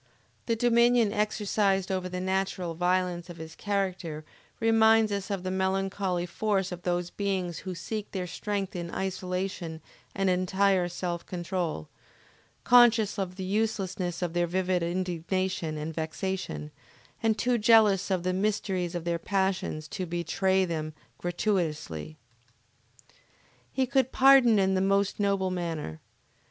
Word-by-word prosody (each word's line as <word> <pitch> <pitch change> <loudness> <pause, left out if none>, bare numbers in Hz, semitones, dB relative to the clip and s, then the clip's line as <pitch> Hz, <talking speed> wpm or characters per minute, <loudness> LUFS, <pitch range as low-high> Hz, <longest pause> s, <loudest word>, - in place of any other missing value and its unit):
The 230 - +2
dominion 235 -1 +4
exercised 205 -2 +1
over 185 -1 -2
the 180 0 -4
natural 190 -2 -1
violence 180 0 0
of 175 - -9
his 160 -1 -8
character 185 -6 -3 0.3
reminds 225 -1 +4
us 200 0 -3
of 195 -3 -3
the 185 - -2
melancholy 190 -1 -1
force 195 +1 -1
of 180 -1 -6
those 175 0 -1
beings 190 -4 -2
who 185 -2 -6
seek 215 +4 -5
their 185 -2 -3
strength 200 +2 -3
in 170 -1 -4
isolation 185 -3 -3 0.4
and 195 0 +1
entire 185 0 +2
self 175 -1 -3
control, 175 - -3 0.8
conscious 230 -4 +5
of 185 -2 -3
the 190 - -5
uselessness 190 -3 -1
of 170 -2 -2
their 175 0 +1
vivid 185 0 0
indignation 175 -1 -2
and 155 +2 -4
vexation, 160 - -4 0.5
and 225 -1 +2
too 240 +2 +1
jealous 210 -3 +5
of 185 -2 0
the 185 0 0
mysteries 190 -3 -1
of 175 - -3
their 170 0 -1
passions 190 -5 -1
to 185 +3 -4
betray 185 +3 +1
them 155 -3 -4 0.2
gratuitously. 160 - -2 1.5
He 265 - +1
could 260 0 +1
pardon 260 -4 +6
in 190 -1 +3
the 185 - +1
most 195 +1 +1
noble 195 -2 +1
manner. 165 - -4
185 Hz, 135 wpm, -28 LUFS, 175-200 Hz, 1.5 s, pardon